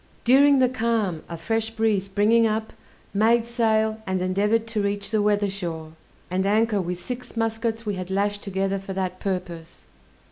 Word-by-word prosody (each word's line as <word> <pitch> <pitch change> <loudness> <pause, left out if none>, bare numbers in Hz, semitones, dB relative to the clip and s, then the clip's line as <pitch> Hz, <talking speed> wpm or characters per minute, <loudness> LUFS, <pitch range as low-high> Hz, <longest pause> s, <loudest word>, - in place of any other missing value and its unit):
During 275 +3 +6
the 260 -1 +4
calm 225 -8 -1
a 170 - -5
fresh 225 +6 -1
breeze 220 -3 0
springing 210 +4 +3
up, 220 0 -2 0.4
made 225 +3 +3
sail, 220 -2 +1
and 190 0 0
endeavored 205 +5 +1
to 220 -2 -1
reach 200 0 -2
the 215 -2 +2
weather 205 0 +2
shore, 170 -5 -5 0.4
and 185 +1 +1
anchor 210 +1 +2
with 180 0 -4
six 250 +2 -7
muskets 225 0 -1
we 205 - -1
had 185 -1 -5
lashed 205 +1 0
together 195 0 -1
for 195 0 -7
that 185 -1 -3
purpose. 180 -4 -5
205 Hz, 170 wpm, -24 LUFS, 190-225 Hz, 0.4 s, During